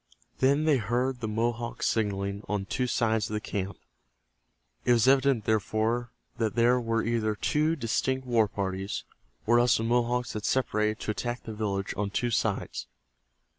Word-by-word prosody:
Then 140 Hz, +3 st, +3 dB
they 155 Hz, -3 st, +4 dB
heard 125 Hz, +3 st, -1 dB
the 115 Hz, -, -3 dB
Mohawks 115 Hz, +2 st, -1 dB
signaling 100 Hz, -2 st, -1 dB
on 100 Hz, -2 st, -1 dB
two 125 Hz, +5 st, -1 dB
sides 110 Hz, -2 st, +1 dB
of 105 Hz, -, -3 dB
the -, -, 0 dB
camp. 100 Hz, -2 st, -4 dB, 1.1 s
It 120 Hz, -, +4 dB
was 115 Hz, 0 st, +3 dB
evident, 135 Hz, -4 st, +4 dB
therefore, 110 Hz, +3 st, 0 dB, 0.3 s
that 110 Hz, -2 st, 0 dB
there 120 Hz, +1 st, +4 dB
were 115 Hz, -1 st, 0 dB
either 110 Hz, -2 st, 0 dB
two 155 Hz, +8 st, +1 dB
distinct 130 Hz, 0 st, -1 dB
war 115 Hz, -3 st, +3 dB
parties, 95 Hz, 0 st, -3 dB, 0.4 s
or 120 Hz, +2 st, +5 dB
else 120 Hz, -1 st, +4 dB
the 110 Hz, -, -2 dB
Mohawks 120 Hz, +1 st, +1 dB
had 105 Hz, -, -4 dB
separated 110 Hz, -4 st, +1 dB
to -, -, -1 dB
attack 120 Hz, +3 st, -4 dB
the 110 Hz, -, -6 dB
village 100 Hz, -2 st, -2 dB
on 105 Hz, -1 st, -1 dB
two 120 Hz, +4 st, -1 dB
sides. -, -, -1 dB
115 Hz, 165 wpm, -28 LUFS, 105-125 Hz, 1.1 s, or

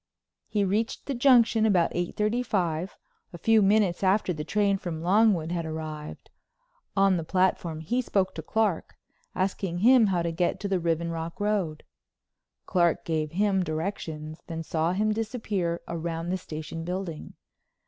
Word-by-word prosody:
He 205 Hz, -2 st, 0 dB
reached 215 Hz, +4 st, -1 dB
the 280 Hz, -, -2 dB
Junction 240 Hz, -3 st, +4 dB
about 185 Hz, -6 st, +3 dB
eight 175 Hz, 0 st, -3 dB
thirty 215 Hz, +4 st, +1 dB
five, 180 Hz, -6 st, -1 dB, 0.4 s
a -, -, -7 dB
few 225 Hz, +5 st, +4 dB
minutes 200 Hz, -3 st, +3 dB
after 190 Hz, -1 st, +2 dB
the 150 Hz, -2 st, -5 dB
train 200 Hz, +2 st, +1 dB
from 165 Hz, -4 st, -5 dB
Longwood 185 Hz, -3 st, +3 dB
had 170 Hz, -1 st, -1 dB
arrived. 155 Hz, -1 st, -7 dB, 0.7 s
On 195 Hz, -1 st, +4 dB
the 165 Hz, -, -3 dB
platform 175 Hz, -2 st, 0 dB
he 240 Hz, +11 st, 0 dB
spoke 195 Hz, -6 st, 0 dB
to 160 Hz, -, -6 dB
Clark, 210 Hz, +1 st, -1 dB, 0.4 s
asking 185 Hz, -1 st, -1 dB
him 235 Hz, +3 st, +6 dB
how 180 Hz, -3 st, +1 dB
to 170 Hz, -, -1 dB
get 175 Hz, +1 st, 0 dB
to 200 Hz, -, -2 dB
the 195 Hz, -2 st, +1 dB
Riven 170 Hz, 0 st, -1 dB
Rock 165 Hz, +2 st, -5 dB
Road. 205 Hz, -7 st, -1 dB, 0.8 s
Clark 170 Hz, -3 st, +1 dB
gave 155 Hz, -2 st, -2 dB
him 200 Hz, +1 st, +2 dB
the 185 Hz, -, 0 dB
directions, 155 Hz, -2 st, -4 dB
then 165 Hz, -1 st, -4 dB
saw 160 Hz, +2 st, 0 dB
him 215 Hz, +3 st, +1 dB
disappear 210 Hz, -6 st, -2 dB
round 170 Hz, 0 st, -3 dB
the 185 Hz, -, 0 dB
station 160 Hz, 0 st, -6 dB
building. 180 Hz, -2 st, -5 dB
180 Hz, 160 wpm, -27 LUFS, 165-205 Hz, 0.8 s, him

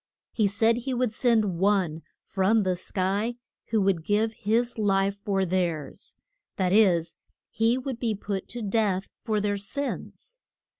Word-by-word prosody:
He 215 Hz, -3 st, +2 dB
said 225 Hz, +3 st, +2 dB
he 255 Hz, +1 st, -3 dB
would 245 Hz, -2 st, 0 dB
send 215 Hz, -7 st, +2 dB
One 190 Hz, -5 st, +1 dB, 0.2 s
from 200 Hz, +3 st, +2 dB
the 185 Hz, -1 st, +1 dB
sky 195 Hz, +5 st, -1 dB, 0.3 s
who 225 Hz, -, +1 dB
would 190 Hz, -4 st, +1 dB
give 215 Hz, +4 st, +1 dB
his 230 Hz, +3 st, 0 dB
life 195 Hz, -1 st, +2 dB
for 195 Hz, -1 st, 0 dB
theirs: 170 Hz, -5 st, -2 dB, 0.4 s
that 185 Hz, -1 st, +1 dB
is, 180 Hz, -6 st, +3 dB, 0.3 s
he 230 Hz, +1 st, +2 dB
would 260 Hz, -2 st, -4 dB
be 225 Hz, -3 st, 0 dB
put 200 Hz, -1 st, -4 dB
to 240 Hz, -1 st, -6 dB
death 200 Hz, -2 st, 0 dB
for 215 Hz, -2 st, -1 dB
their 205 Hz, 0 st, 0 dB
sins. 280 Hz, -, -5 dB
205 Hz, 150 wpm, -26 LUFS, 190-225 Hz, 0.4 s, is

